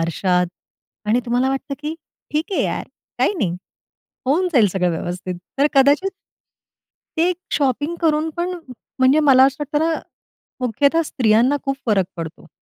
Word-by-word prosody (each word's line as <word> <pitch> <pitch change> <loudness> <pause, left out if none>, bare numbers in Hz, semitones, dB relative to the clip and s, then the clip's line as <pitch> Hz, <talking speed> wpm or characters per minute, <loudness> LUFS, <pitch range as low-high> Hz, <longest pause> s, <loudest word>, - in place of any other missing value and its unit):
आरशात 180 +2 +1 0.6
आणि 235 +4 +3
तुम्हाला 245 +2 +1
वाटतं 270 +1 -3
की 310 +2 -3 0.4
"ठीक 315 +7 -1
आहे - - +1
यार, - - -2 0.3
काही - - +3
नाही, 180 -5 0 0.7
होऊन 345 +7 +2
जाईल 235 -8 +5
सगळं 180 -1 0
व्यवस्थित." 180 +2 -4 0.2
तर 285 - +5
कदाचित 285 +8 +4 1.1
ते - - +4
एक 355 - -2 0.2
शॉपिंग 290 +4 0
करून 315 -1 +2
पण, 350 +1 -1 0.5
म्हणजे 265 +4 +5
मला 260 -1 +8
असं 270 0 +2
वाटतं 295 +2 0
ना, 325 0 +1 0.7
मुख्यतः 280 +7 +2
स्त्रियांना 245 +2 +3
खूप 275 0 -1
फरक 200 -4 +3
पडतो. 165 0 -7
270 Hz, 145 wpm, -20 LUFS, 210-300 Hz, 1.1 s, मला